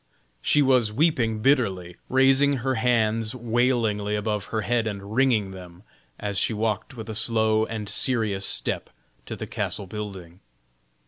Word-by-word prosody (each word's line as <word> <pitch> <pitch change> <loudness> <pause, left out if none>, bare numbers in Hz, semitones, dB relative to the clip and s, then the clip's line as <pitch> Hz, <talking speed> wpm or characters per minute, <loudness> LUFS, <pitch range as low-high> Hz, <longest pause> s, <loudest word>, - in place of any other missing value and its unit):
She 145 - +3
was 125 -5 +3
weeping 115 -5 +1
bitterly, 95 -11 +1
raising 135 +2 +4
her 135 - +1
hands 115 -2 +1
wailingly 115 -3 0
above 105 -1 -2
her 110 - -3
head 115 +2 0
and 100 0 -6
wringing 115 -6 +2
them, 90 -1 -12 0.4
as 100 -2 -2
she 110 - 0
walked 110 +3 -2
with 110 - -7
a 110 - -5
slow 110 -1 +2
and 110 -2 -5
serious 110 -5 +1
step - - 0 0.4
to - - -5
the - - -6
castle 100 - -3
building. 95 -4 -8
110 Hz, 145 wpm, -24 LUFS, 105-120 Hz, 0.4 s, raising